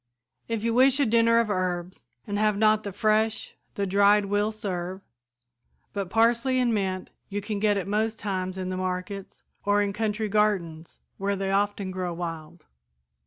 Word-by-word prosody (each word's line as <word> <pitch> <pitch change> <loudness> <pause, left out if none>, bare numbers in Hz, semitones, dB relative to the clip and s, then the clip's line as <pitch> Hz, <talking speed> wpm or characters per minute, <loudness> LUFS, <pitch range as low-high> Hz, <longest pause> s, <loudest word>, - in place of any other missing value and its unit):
If 225 -2 -2
you 230 0 +1
wish 265 +3 +5
a 285 - +4
dinner 230 0 +4
of 230 -2 +2
herbs 180 -1 -3 0.2
and 205 -2 -2
have 210 -1 +2
not 215 0 +4
the 205 - -5
fresh, 215 +2 +1 0.2
the 200 - -1
dried 200 +2 +4
will 205 +2 +1
serve, 190 -3 -4 0.9
but 200 -3 -3
parsley 235 +4 +3
and 245 -2 +2
mint 190 -3 -2 0.2
you 205 0 -2
can 205 0 -4
get 205 -1 +2
at 195 - -3
most 215 +2 0
times 185 -3 -3
in 185 -1 -3
the 185 - -3
markets, 185 +2 -4 0.2
or 205 0 +3
in 200 -1 0
country 215 +1 -1
gardens, 195 -6 0 0.2
where 200 +1 0
they 195 0 -2
often 200 -1 0
grow 180 -2 -3
wild. 165 -1 -6
205 Hz, 170 wpm, -26 LUFS, 185-215 Hz, 0.9 s, wish